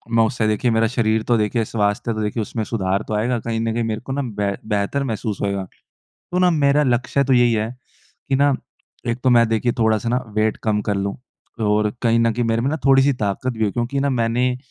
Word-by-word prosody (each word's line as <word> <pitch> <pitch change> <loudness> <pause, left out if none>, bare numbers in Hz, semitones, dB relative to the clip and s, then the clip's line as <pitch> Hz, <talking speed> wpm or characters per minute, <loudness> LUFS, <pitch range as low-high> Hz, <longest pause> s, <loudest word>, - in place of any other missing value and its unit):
मैं 115 - +5
उससे 110 -1 -1
देखिए, 110 +3 +1
मेरा 115 0 +3
शरीर 110 -2 0
तो 120 - +4
देखिए, 110 +2 0
स्वास्थ्य 105 +2 -1
तो 110 - -3
देखिए, 105 +2 -2
उसमें 110 +1 -3
सुधार 100 -2 -1
तो - - -3
आएगा। 120 +3 0
कहीं 115 0 -3
न 115 0 -1
कहीं 120 +1 -1
मेरे 110 -1 -3
को - - -5
ना 140 - -1
बे 105 -5 -2 0.2
बेहतर 105 +7 0
महसूस 110 -4 -3
होएगा। 100 -1 -1 0.7
तो 180 - +1
ना, 180 -1 +4
मेरा 145 -2 +3
लक्ष्य 130 +1 +1
तो 135 - +1
यही 120 -2 +4
है 110 0 0 0.6
कि 135 - +2
ना, 140 0 +3 0.5
एक 120 +1 -1
तो 130 - +4
मैं 120 -1 +5
देखिए, 115 +2 +1
थोड़ा-सा 110 0 +2
ना 125 +2 0
वेट 110 0 +2
कम 105 -2 +1
कर 105 - +2
लूँ, 100 0 -2 0.4
और 105 0 +2
कहीं 115 -1 +3
न 115 0 +3
कहीं 120 +2 -1
मेरे 115 0 0
में 135 - +1
ना 155 - -1
थोड़ी-सी 135 +1 +5
ताकत 105 +6 -1
भी 110 -1 -1
हो। 105 - +1
क्योंकि 125 +3 -1
ना, 140 0 +1
मैंने 125 +1 +1
115 Hz, 235 wpm, -21 LUFS, 110-125 Hz, 0.7 s, मैं